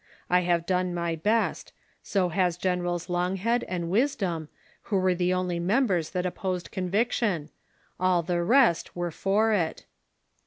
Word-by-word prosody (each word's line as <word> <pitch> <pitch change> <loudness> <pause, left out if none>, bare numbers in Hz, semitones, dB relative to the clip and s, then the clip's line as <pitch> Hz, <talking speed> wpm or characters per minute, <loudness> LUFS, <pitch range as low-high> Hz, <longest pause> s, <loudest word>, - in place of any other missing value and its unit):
I 180 - +6
have 175 -1 +1
done 180 -1 0
my 170 -1 -1
best; 215 +7 0 0.3
so 190 -3 0
has 175 0 +1
Generals 180 -1 -1
Longhead 185 +6 0
and 170 -2 -3
Wisdom, 190 - 0 0.4
who 205 - +2
were 185 -1 +2
the 180 0 0
only 180 -1 -1
members 185 - +1
that 180 -1 -2
opposed 180 -1 -3
conviction; 190 -4 0 0.5
all 180 -1 +2
the 175 +1 0
rest 230 - +3
were 175 -1 -2
for 210 +6 +1
it." 170 -6 -1
180 Hz, 145 wpm, -27 LUFS, 175-195 Hz, 0.5 s, I